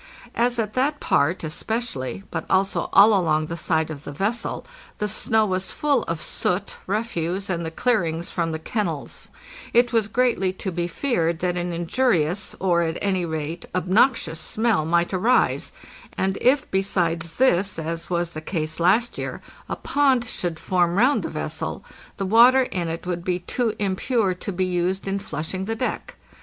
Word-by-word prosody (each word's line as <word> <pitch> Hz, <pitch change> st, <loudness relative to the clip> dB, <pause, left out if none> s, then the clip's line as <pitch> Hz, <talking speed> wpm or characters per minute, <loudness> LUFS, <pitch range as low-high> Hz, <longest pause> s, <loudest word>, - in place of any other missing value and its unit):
As 240 Hz, +1 st, +1 dB
at 215 Hz, -2 st, -1 dB
that 285 Hz, +3 st, +1 dB
part 160 Hz, +6 st, +1 dB
especially, 195 Hz, -, -3 dB
but 165 Hz, -1 st, -3 dB
also 190 Hz, +1 st, +1 dB
all 205 Hz, +3 st, +7 dB
along 155 Hz, -5 st, +2 dB
the 165 Hz, -, -5 dB
side 160 Hz, -2 st, 0 dB
of 145 Hz, -1 st, -8 dB
the -, -, -7 dB
vessel, 205 Hz, +10 st, -2 dB, 0.3 s
the 210 Hz, -, -1 dB
snow 220 Hz, +1 st, +2 dB
was 185 Hz, -1 st, -1 dB
full 285 Hz, -4 st, +1 dB
of 165 Hz, -1 st, -3 dB
soot, 185 Hz, +3 st, -1 dB
refuse, 195 Hz, -3 st, -2 dB
and 170 Hz, -1 st, -2 dB
the 165 Hz, -, -3 dB
clearings 170 Hz, -4 st, 0 dB
from 170 Hz, -2 st, -1 dB
the 160 Hz, -, -2 dB
kennels, 165 Hz, -3 st, -4 dB, 0.4 s
it 240 Hz, 0 st, +4 dB
was 225 Hz, -3 st, +3 dB
greatly 230 Hz, -5 st, +1 dB
to 190 Hz, 0 st, -4 dB
be 175 Hz, 0 st, -2 dB
feared 170 Hz, -5 st, 0 dB
that 180 Hz, -1 st, 0 dB
an 175 Hz, 0 st, -2 dB
injurious, 175 Hz, 0 st, 0 dB
or, 175 Hz, -2 st, +2 dB
at 165 Hz, 0 st, -1 dB
any 190 Hz, -3 st, 0 dB
rate, 160 Hz, +1 st, -4 dB
obnoxious 185 Hz, -2 st, +2 dB
smell 215 Hz, -1 st, +1 dB
might 170 Hz, +3 st, +1 dB
arise, 225 Hz, +7 st, +2 dB, 0.5 s
and 190 Hz, 0 st, 0 dB
if, 260 Hz, +3 st, +3 dB
besides 170 Hz, -3 st, 0 dB
this, 195 Hz, -7 st, +2 dB
as 165 Hz, +1 st, -4 dB
was 175 Hz, -1 st, 0 dB
the 155 Hz, -, -6 dB
case 155 Hz, -1 st, -3 dB
last 205 Hz, +8 st, +2 dB
year, -, -, -4 dB, 0.3 s
a -, -, -1 dB
pond 270 Hz, -4 st, +2 dB
should 175 Hz, -7 st, -3 dB
form 175 Hz, -2 st, +1 dB
round 255 Hz, +8 st, +4 dB
the -, -, -4 dB
vessel, -, -, -4 dB, 0.3 s
the 195 Hz, -, -2 dB
water 240 Hz, +6 st, +6 dB
in 180 Hz, -8 st, -3 dB
it 165 Hz, +2 st, -5 dB
would 175 Hz, -1 st, -3 dB
be 180 Hz, -1 st, 0 dB
too 220 Hz, +5 st, -2 dB
impure 200 Hz, +1 st, 0 dB
to 185 Hz, +3 st, -5 dB
be 185 Hz, 0 st, 0 dB
used 185 Hz, +2 st, -1 dB
in 195 Hz, +1 st, -1 dB
flushing 185 Hz, +1 st, -4 dB
the 225 Hz, +2 st, -2 dB
deck. 250 Hz, +3 st, -3 dB
185 Hz, 175 wpm, -23 LUFS, 170-225 Hz, 0.5 s, all